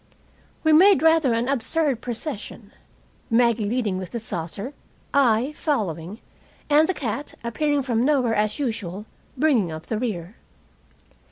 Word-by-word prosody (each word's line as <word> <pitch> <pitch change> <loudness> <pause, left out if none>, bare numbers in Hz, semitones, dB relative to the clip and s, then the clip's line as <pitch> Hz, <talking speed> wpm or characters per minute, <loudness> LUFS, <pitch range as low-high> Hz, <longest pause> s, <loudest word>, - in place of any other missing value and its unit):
We 315 -1 +4
made 355 -1 +6
rather 320 -5 +4
an 230 +1 0
absurd 275 0 0
procession, 235 -4 -6 0.6
Maggie 230 -3 +2
leading 220 -6 -1
with 185 -2 -6
the 235 - -4
saucer, 200 - -5 0.4
I 255 0 +3
following, 200 - -2 0.5
and 305 +3 +5
the 375 - 0
cat, 250 +2 -4
appearing 290 +4 0
from 235 -3 0
nowhere 260 -5 +2
as 215 0 0
usual, 210 - -4 0.3
bringing 250 - +2
up 155 0 -7
the 220 - -2
rear. 205 -5 -4
235 Hz, 135 wpm, -23 LUFS, 210-285 Hz, 0.6 s, made